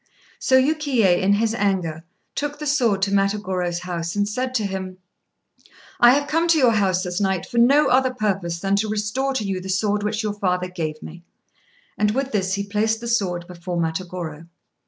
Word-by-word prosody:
So 260 -1 +4
Yukiyé, 260 - +2
in 195 +2 +3
his 220 +2 +1
anger, 185 -8 -1 0.3
took 290 0 -3
the 300 - -6
sword 235 -10 +2
to 195 - +1
Matagorô's 190 -3 0
house, 170 -1 -4
and 205 0 +1
said 255 +4 -3
to 220 - +1
him 190 -1 -5 1.0
"I 240 +1 +7
have 290 0 -1
come 330 +3 +1
to 335 -1 +4
your 255 -5 +5
house 190 -4 +1
this 180 +1 -3
night 190 -3 0
for 235 - -2
no 275 +6 +5
other 260 +1 +3
purpose 195 -8 -2
than 195 +2 +1
to 215 +1 0
restore 215 +6 -1
to 225 - -1
you 195 -2 -3
the 190 - -8
sword 205 +2 0
which 210 +2 -2
your 210 -1 -1
father 180 -3 -1
gave 155 -4 -5
me;" 170 +2 -10 0.8
and 210 +1 +2
with 270 0 -1
this 190 -2 0
he 200 - -2
placed 215 +2 0
the 235 - -6
sword 185 -7 0
before 175 0 -6
Matagorô. 165 -1 -4
200 Hz, 195 wpm, -22 LUFS, 180-235 Hz, 1.0 s, I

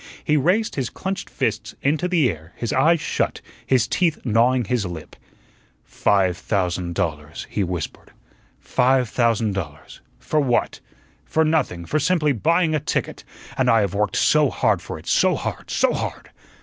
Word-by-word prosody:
He 150 - +2
raised 180 +10 +2
his 130 -4 -2
clenched 190 0 -5
fists - - -2
into 155 +5 +1
the 170 -7 +3
air, 80 0 -12
his 115 - -3
eyes 160 +5 +4
shut, - - -1 0.3
his 125 -4 +3
teeth 160 +5 +1
gnawing 120 +2 +3
his 120 +1 0
lip. 85 -4 -7 0.7
"Five 95 -3 +1
thousand 90 -3 -2
dollars," 75 -1 -3
he 105 - 0
whispered; 90 -3 -5 0.5
"five 130 -1 +2
thousand 115 -3 +1
dollars. 75 -6 -7 0.2
For 155 - -1
what? 130 -5 0 0.4
For 160 0 +1
nothing, 135 - 0
for 155 - 0
simply 155 -1 +2
buying 160 - +2
a 155 - +2
ticket; - - -3 0.3
and - - +2
I 115 -1 +5
have 100 -2 -1
worked 105 +1 0
so 150 -2 +4
hard - - +1
for - - -7
it, - - -13
so - - +3
hard, - - -5
so - - +2
hard. - - -5
125 Hz, 160 wpm, -22 LUFS, 95-155 Hz, 0.7 s, I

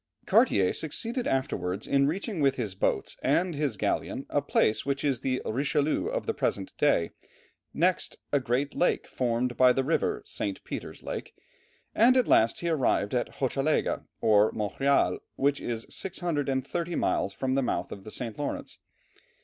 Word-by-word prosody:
Cartier 95 -2 +4
succeeded 230 - -3
afterwards 100 -7 -1
in 140 0 +3
reaching 195 +4 -3
with 135 -2 +3
his 110 -7 -3
boats 95 - -1
and 170 +6 +2
his 145 -7 -1
galleon - - -1
a - - +2
place 110 - +2
which 140 -1 -2
is 135 -5 +1
the 130 0 -1
Richelieu 145 +5 0
of - - -2
the - - 0
present 95 - -2
day, 85 - +3 0.6
next, 180 +3 +1 0.2
a 145 - +5
great 130 +3 -1
lake 180 - +1
formed 120 0 -1
by 130 -1 +7
the 135 - +1
river 410 - 0
St. - - -4
Peter's - - -7
Lake - - -6 0.6
and 250 +3 +5
at 250 - +3
last 115 +1 +4
he 170 - -1
arrived 130 -9 +1
at 125 - -1
Hochelaga 135 +3 0
or 105 -1 +4
Montreal, 125 +7 +1 0.2
which 140 +1 +1
is 115 -1 -4
630 165 -2 -2
miles - - 0
from 130 -1 -2
the 135 - +2
mouth 125 - -2
of 100 - -8
the 110 - -9
St. 115 -1 -4
Lawrence. 145 - -4
135 Hz, 160 wpm, -28 LUFS, 120-155 Hz, 0.6 s, by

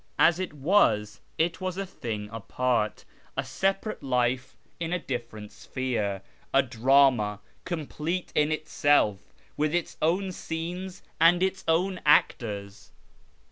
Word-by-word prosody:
As 170 +2 +5
it 185 -5 -3
was, 115 - +2 0.2
it 170 +3 0
was 185 -1 -3
a 195 - -2
thing 110 - -5
apart; 115 0 -1 0.3
a - - 0
separate 195 +3 -1
life 125 -1 0 0.2
in 165 0 -3
a 180 - +1
different 120 -8 -6
sphere; 105 -7 -3 0.3
a 135 - +5
drama, 125 -4 +3 0.3
complete 170 +1 -3
in 150 +1 +2
itself, 145 -10 +1 0.3
with 150 +2 +1
its 175 - -2
own 185 +4 +1
scenes 180 +3 -5 0.2
and 175 +3 +5
its 190 0 -1
own 180 +3 +1
actors. 105 -8 +1
145 Hz, 125 wpm, -27 LUFS, 115-175 Hz, 0.3 s, As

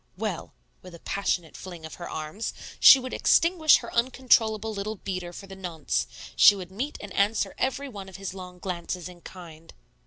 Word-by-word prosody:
Well - - -4 0.3
(with 180 -2 -12
a - - -13
passionate 180 -4 -2
fling 175 -4 -9
of 160 - -9
her - - -6
arms), 155 +8 -5 0.2
she - - +10
would 255 0 -6
extinguish 330 -2 +4
her 235 - -9
uncontrollable 230 -3 +2
little 210 +2 -4
beater 185 -3 -5
for 185 - -10
the 195 0 -10
nonce; 175 -5 -2 0.3
she 205 - +8
would 185 -2 -8
meet 260 +10 -4
and 205 -2 -9
answer 205 +3 +1
every 265 +2 -1
one 200 -6 -9
of 190 - -13
his 195 -1 -6
long 180 -1 -9
glances 180 -1 -5
in 180 -1 -13
kind. 165 -3 -12
195 Hz, 185 wpm, -26 LUFS, 180-225 Hz, 0.3 s, she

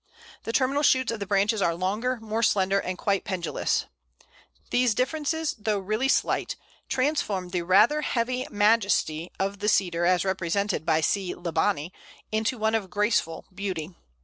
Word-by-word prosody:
The - - -2
terminal 270 +4 +1
shoots 260 -4 +3
of 230 - -4
the 200 - -4
branches 205 +2 +2
are 170 -2 +2
longer, 210 +8 -1
more 225 0 -3
slender, 195 -3 +2
and 185 -1 -4
quite 200 0 0
pendulous. 185 -3 -1 0.9
These 245 -3 +2
differences, 310 +4 -1
though 210 0 0
really 215 +6 -1
slight, - - +1 0.3
transform 255 -10 0
the 180 -1 -1
rather 210 - +4
heavy 250 -1 -1
majesty 205 -6 +1
of 195 +1 -2
the 210 +1 +1
Cedar, 175 -5 +1
as 180 0 +2
represented 190 0 -1
by 160 -1 +3
C. 190 +2 0
libani, 170 -1 -1 0.4
into 220 +4 0
one 220 0 0
of 210 -4 -1
graceful 205 -4 0
beauty. 185 -3 -4
205 Hz, 150 wpm, -26 LUFS, 185-230 Hz, 0.9 s, rather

